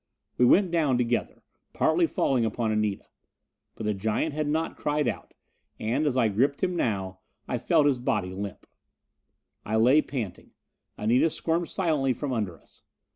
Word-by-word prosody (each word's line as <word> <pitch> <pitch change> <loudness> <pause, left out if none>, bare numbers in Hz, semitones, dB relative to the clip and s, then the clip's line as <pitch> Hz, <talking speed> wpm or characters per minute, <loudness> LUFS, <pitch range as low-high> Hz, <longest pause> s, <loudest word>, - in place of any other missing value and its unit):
We 125 - +4
went 185 +7 +4
down 150 -7 +2
together, 120 -1 -1 0.3
falling 345 -2 +3
partly 135 - +1
upon 110 0 -1
Anita. 105 -2 -1 0.7
But 110 - -6
the 105 - +1
giant 110 +10 -1
had 150 0 -2
not 160 +2 -1
cried 150 -1 -1
out, 105 -6 -5 0.4
and 130 +8 0
as 130 -3 0
I 120 -3 +4
gripped 130 - 0
him 180 -1 +1
now, 95 - -2 0.3
I 125 - -2
felt 160 +2 +3
his 140 -4 +2
body 95 -6 -1
limp. 100 0 -6 1.0
I 110 - -2
lay 125 +7 +5
panting. 115 -13 -6 0.4
Anita 120 +9 +3
squirmed 165 +2 -2
silently 150 -8 +1
from 140 +1 -4
under 100 -8 -2
us. - - -23
125 Hz, 160 wpm, -27 LUFS, 110-150 Hz, 1.0 s, lay